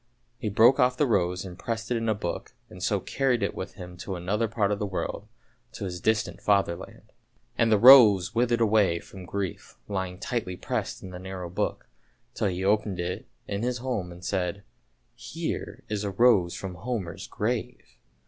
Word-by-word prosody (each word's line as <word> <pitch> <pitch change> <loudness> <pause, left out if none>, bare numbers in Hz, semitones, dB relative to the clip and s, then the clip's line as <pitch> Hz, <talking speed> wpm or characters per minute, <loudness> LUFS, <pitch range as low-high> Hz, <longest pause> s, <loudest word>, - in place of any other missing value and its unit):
He 110 -4 -2
broke 115 +7 +5
off 125 0 +3
the 145 - +3
rose 90 -6 +1
and 90 -2 -9
pressed 115 0 -4
it 120 - +2
in 115 0 -1
a 110 - +2
book, 90 -4 -5 0.2
and - - -11
so - - +1
carried 130 -5 0
it 100 - +2
away - - -19
with 95 - -5
him 90 -2 -9
to 95 +1 -5
another 100 +6 -1
part 105 -2 0
of 100 - -1
the 105 - -1
world, 95 - -4 0.5
to - - -5
his 90 -2 -5
distant 110 +2 0
Fatherland. 100 -4 -1 0.4
And 115 -1 +2
the 110 - +6
rose 110 -5 +8
withered 120 0 +2
away 105 -6 +3
from 95 +1 -11
grief 100 0 -5
lying 95 -3 -3
tightly 100 -4 -3
pressed - - -3
in 95 - -8
the 90 - -7
narrow 95 -2 -6
book, 90 - -2 0.5
till - - 0
he 95 0 -2
opened 105 -2 +1
it 90 +1 -3 0.2
in 100 0 -3
his 125 +1 -1
home 120 -8 -3
and 90 +1 -11
said, 95 0 -2 0.3
" - - -44 0.2
here - - -5
is 105 -1 -2
a 100 - -1
rose 100 -4 +4
from 95 -2 -5
Homer's 110 -8 -4
grave! - - -3
100 Hz, 195 wpm, -27 LUFS, 90-115 Hz, 0.5 s, rose